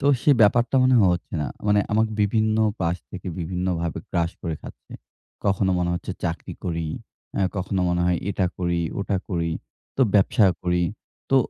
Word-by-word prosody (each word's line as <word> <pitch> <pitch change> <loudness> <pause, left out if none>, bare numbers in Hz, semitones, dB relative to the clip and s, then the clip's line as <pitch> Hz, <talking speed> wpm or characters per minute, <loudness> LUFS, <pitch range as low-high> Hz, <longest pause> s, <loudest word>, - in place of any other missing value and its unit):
তো 140 - 0 0.2
সেই 145 - +6
ব্যাপারটা 120 +5 +4
মনে 130 0 +5
হচ্ছে 90 -1 0
না। - - -2 0.2
মানে 105 0 +4
আমাকে 110 +1 +2
বিভিন্ন 110 +1 +2 0.2
পাশ 85 0 +1
থেকে 95 -1 -8
বিভিন্নভাবে 90 -1 -2
গ্রাস 85 -1 +1
করে 85 -3 -2
খাচ্ছে। - - -12 0.5
কখনো 100 -1 +2
মনে 85 -1 0
হচ্ছে 85 - -4
চাকরি 85 0 -3
করি। 85 -2 -2 0.5
অ্যা 100 - +1
কখনো 95 +1 -1
মনে 90 0 +1
হয় 90 - +2
এটা 95 -1 +1
করি, 85 -1 0 0.2
ওটা 100 0 0
করি। 85 -3 -1 0.5
তো 135 - +4
ব্যবসা 100 +1 +5 0.2
করি। 90 0 +2 0.5
তো, 135 - +5
90 Hz, 165 wpm, -24 LUFS, 85-105 Hz, 0.5 s, সেই